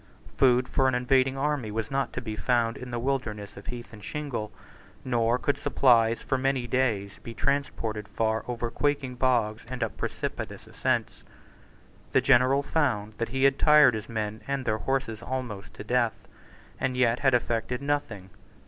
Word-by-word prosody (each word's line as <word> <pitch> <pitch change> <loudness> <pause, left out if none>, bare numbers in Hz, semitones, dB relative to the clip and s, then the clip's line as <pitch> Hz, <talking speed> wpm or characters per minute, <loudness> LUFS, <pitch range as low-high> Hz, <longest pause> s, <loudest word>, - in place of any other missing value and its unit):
Food 125 -1 +4
for 130 - +2
an 130 - +2
invading 130 +1 +2
army 140 -5 -1
was 110 +2 -3
not 135 0 0
to 125 - -4
be 110 -3 -5
found 115 -1 +1
in 125 - -8
the 120 - -3
wilderness 115 -5 -3
of 100 - -12
heath 120 -1 -7
and 105 -2 -12
shingle; 135 -8 -4 0.5
nor 120 -1 +2
could 140 +2 -1
supplies 120 -5 +3
for 130 - 0
many 135 -1 0
days 115 -6 0
be 115 - -9
transported 115 -7 -1
far 110 0 -1
over 120 -1 -3
quaking 145 -2 0
bogs 120 -4 +1
and 125 -1 -3
up 115 - -3
precipitous - - -4
ascents. - - -1 0.9
The - - +6
general 130 +3 +4
found 115 -10 0
that 115 - -1
he 130 +2 -1
had 135 0 +4
tired 150 -4 +7
his 110 0 -5
men 110 -1 -3
and 140 -1 -2
their 110 0 0
horses 130 -4 -2
almost 120 -5 -5
to - - -7
death, 120 -2 +1 0.6
and 130 -1 -1
yet 120 -1 +3
had 135 -3 +4
effected 120 +1 -1
nothing. 135 -10 -3
125 Hz, 170 wpm, -27 LUFS, 115-135 Hz, 0.9 s, tired